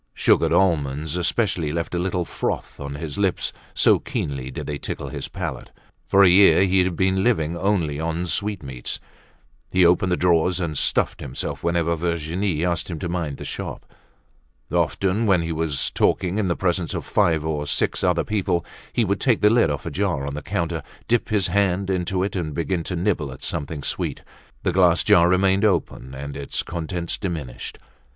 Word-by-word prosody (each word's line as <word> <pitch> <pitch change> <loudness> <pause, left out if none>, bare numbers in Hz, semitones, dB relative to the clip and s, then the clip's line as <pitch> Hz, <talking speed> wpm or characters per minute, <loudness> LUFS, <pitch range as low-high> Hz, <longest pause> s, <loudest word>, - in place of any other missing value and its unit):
Sugared 80 - +3
almonds 80 -4 +1
especially 90 -3 0
left 85 +2 -3
a 90 - 0
little 90 -1 -1
froth - - -4
on 70 0 -5
his 75 +2 -5
lips 95 -3 0 0.2
so - - +5
keenly 70 -2 -4
did 65 - -6
they 75 -1 -4
tickle - - -5
his - - -5
palate. - - -5 0.4
For 100 +1 +5
a - - +8
year 95 +1 +6
he 95 -1 +3
had 90 -1 -1
been 95 +2 +1
living 85 -9 +1
only 85 -6 0
on 85 +2 -2
sweetmeats. 75 -10 -3 0.7
He 90 -1 +4
opened 90 +2 +3
the 90 - +2
drawers 90 +1 +2
and 85 -4 -2
stuffed - - +1
himself 65 - -4
whenever 85 -1 +1
Virginie 85 +1 -1
asked 85 0 -1
him 85 - -4
to 85 - -4
mind 85 -5 -3
the - - -8
shop. - - -6 0.9
Often, 100 +4 +1
when 90 -4 +4
he 85 - -3
was 80 -3 -1
talking 95 +2 +1
in 100 - +1
the 85 - +1
presence 90 -2 -1
of - - -4
five 80 -2 +2
or 75 -2 -2
six - - 0
other - - +2
people, 95 -5 -1 0.3
he 120 - +1
would 100 0 0
take 125 -4 +2
the 105 - +5
lid 115 -8 +4
off 75 -1 -3
a 85 - -3
jar 85 -5 -1
on 70 - -4
the 75 - -4
counter, 85 +1 -2 0.3
dip 120 0 +1
his 105 -4 +2
hand 95 -1 +1
into 90 0 0
it 100 - -3
and 80 -5 -3
begin 85 +1 -1
to 90 - -3
nibble 85 -6 0
at 65 - -11
something 75 0 -3
sweet; - - -3 0.4
the - - +1
glass 90 -1 +4
jar 85 0 +5
remained 95 +2 +3
open 80 - 0
and 70 +1 -6
its 70 - -3
contents 85 0 -4
diminished. 80 -11 -5
85 Hz, 190 wpm, -23 LUFS, 80-95 Hz, 0.9 s, a